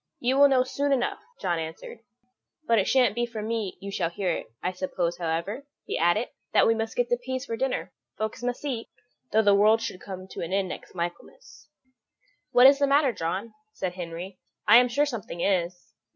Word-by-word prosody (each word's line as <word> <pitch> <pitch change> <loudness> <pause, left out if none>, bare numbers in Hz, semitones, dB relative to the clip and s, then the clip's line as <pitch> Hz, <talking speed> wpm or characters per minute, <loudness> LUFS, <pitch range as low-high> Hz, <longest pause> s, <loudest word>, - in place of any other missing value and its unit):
"You 260 +1 +1
will 285 - +9
know 260 -2 +4
soon 280 +2 -1
enough," 255 -3 0 0.2
John 175 -2 -1
answered, 160 +7 -7 0.7
"but 230 -4 +4
it 190 - 0
shan't 250 -6 +4
be 240 +1 -1
from 220 -2 -5
me 225 -4 -2
you 200 +1 -7
shall 170 -4 -1
learn 185 -4 0
it. - - -10
I 180 - 0
suppose, 180 -2 -2
however," 170 +11 -3 0.2
he - - -3
added, 175 +8 +2 0.2
"that - - +5
we 225 - +4
must 225 0 -3
get 245 -1 +1
the 245 0 +1
peas 260 +1 -3
for 230 - -3
dinner; 265 +2 -2 0.3
folks 215 +1 -3
must 245 +3 -3
eat, 240 -5 -3 0.4
though 220 +1 +4
the 205 -1 +5
world 215 +3 +5
should 190 -4 -5
come 185 -1 -8
to - - -7
an 170 - -4
end 195 -1 +1
next - - -8
Michaelmas." 175 - -7 0.8
"What 245 +1 +7
is 275 +1 +8
the 280 - +3
matter, 280 -2 +3
John?" 190 +5 -3 0.2
said 185 -2 -3
Henry; 180 +1 -7 0.3
"I 220 +3 +9
am 250 0 +6
sure 285 +5 +2
something 220 -10 -5
is." 180 -2 -1
215 Hz, 205 wpm, -26 LUFS, 180-245 Hz, 0.8 s, will